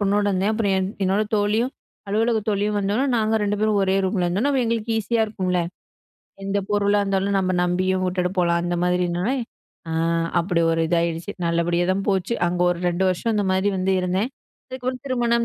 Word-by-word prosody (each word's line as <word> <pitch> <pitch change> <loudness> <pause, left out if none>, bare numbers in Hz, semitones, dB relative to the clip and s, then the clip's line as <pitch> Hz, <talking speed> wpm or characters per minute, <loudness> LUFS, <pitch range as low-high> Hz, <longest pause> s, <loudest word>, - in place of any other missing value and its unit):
பொண்ணோடருந்தேன். 205 0 +1
அப்புறம் 215 -3 0
என் 190 0 0 0.2
என்னோட 195 +3 +2
தோழியும், 215 +5 +1 0.4
அலுவலகத் 220 +1 +1
தோழியும் 205 0 0
வந்தோன 205 +7 0
நாங்க 220 0 +1
ரெண்டு 205 0 0
பேரும் 215 -1 +2
ஒரே 190 0 +2
ரூம்ல 185 -1 0
இருந்தோன்ன, 200 +11 +1
அப்ப 265 -2 +2
எங்களுக்கு 230 0 -1
ஈஸியா 225 +2 +1
இருக்கும்ல. 185 -4 -1 0.8
எந்த 195 +1 0
பொருளா 205 0 +2
இருந்தாலும், 195 0 0
நம்ம 185 -1 0
நம்பியும் 185 +1 +1
உட்டுட்டு 180 0 -1
போலாம் 170 -1 +2
அந்த 175 0 -1
மாதிரினொன்னே 180 +7 0 0.5
அ - - -2 0.5
அப்படி 170 0 0
ஒரு 165 - 0
இதாயிடுச்சு. 170 +3 -1
நல்லபடியா 170 +1 +1
தான் 195 +1 -2
போச்சு. 195 +3 0
அங்க 175 0 -1
ஒரு 175 - -2
2 175 +2 -1
வருஷம் 215 +5 0
இந்த 205 -1 +1
மாதி 190 +2 +1
வந்து 190 +1 +1
இருந்தேன். 185 +7 -1 0.4
அதுக்கப்புறம் 255 0 -4
திருமணம், 235 -2 +1
195 Hz, 170 wpm, -23 LUFS, 180-215 Hz, 0.8 s, என்னோட